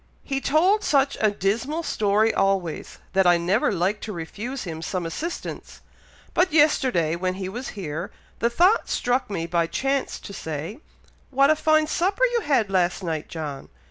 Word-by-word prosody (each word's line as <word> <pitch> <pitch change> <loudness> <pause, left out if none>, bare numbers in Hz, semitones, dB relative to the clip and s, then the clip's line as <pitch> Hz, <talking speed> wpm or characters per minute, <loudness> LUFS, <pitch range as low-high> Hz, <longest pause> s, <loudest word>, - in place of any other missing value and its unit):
"He 270 -1 -2
told 365 +10 +3
such 275 -1 +2
a 215 - +4
dismal 225 - -1
story 215 -3 +2
always, 195 -4 -1 0.2
that 190 -1 +4
I 175 -1 +6
never 180 +7 +1
liked 195 +3 -1
to 220 - -5
refuse 210 +9 -5
him 160 -4 -6
some 180 +1 -3
assistance; 320 - -6 0.5
but 360 0 +2
yesterday, 260 - +3
when 185 +1 -2
he 190 -1 -4
was 240 +7 -5
here, 170 -1 -4 0.3
the 235 - +2
thought 360 - +3
struck 245 0 0
me 170 -5 -2
by 170 0 0
chance 270 +8 -1
to 200 - -9
say, 160 - -5 0.5
'What 275 +2 +4
a - - +4
fine 310 0 +3
supper 385 +9 +1
you 470 - +2
had 235 - +1
last 185 0 +1
night, 160 -3 -3
John!' 150 -4 -6
205 Hz, 170 wpm, -24 LUFS, 175-275 Hz, 0.5 s, I